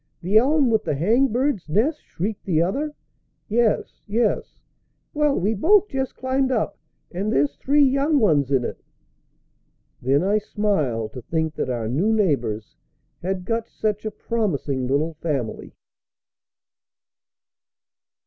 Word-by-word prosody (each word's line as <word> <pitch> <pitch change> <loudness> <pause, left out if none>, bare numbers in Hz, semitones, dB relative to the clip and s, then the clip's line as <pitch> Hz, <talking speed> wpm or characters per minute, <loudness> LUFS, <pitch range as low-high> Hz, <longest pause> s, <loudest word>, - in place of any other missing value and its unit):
"The 190 +5 -1
elm 275 0 +3
with 220 - +2
the 150 - -1
hang 225 - +3
bird's 245 - -1
nest?" 260 - +1
shrieked 200 +4 -4
the 165 -5 +1
other. 280 - -1 0.5
"Yes, 225 0 0
yes!" 235 - 0 0.6
"Well, 295 -2 +2
we 205 +5 +1
both 395 - +4
just 265 -1 -3
climbed 260 0 0
up, 225 -4 0 0.4
and 195 +4 -2
there's 140 +1 +1
three 290 - +3
young 275 +3 +3
ones 150 - +3
in 130 -3 +2
it!" - - -6 1.2
Then 135 +5 +2
I 205 +3 +2
smiled 155 - -1
to 125 - -7
think 160 +4 -2
that - - -3
our 120 -3 -2
new 160 - +1
neighbors 135 - 0 0.5
had 185 0 -3
got 230 +2 -2
such 210 -1 -2
a 215 - -2
promising 155 - -2
little 150 +5 0
family. 140 -9 -3
205 Hz, 135 wpm, -23 LUFS, -, 1.2 s, both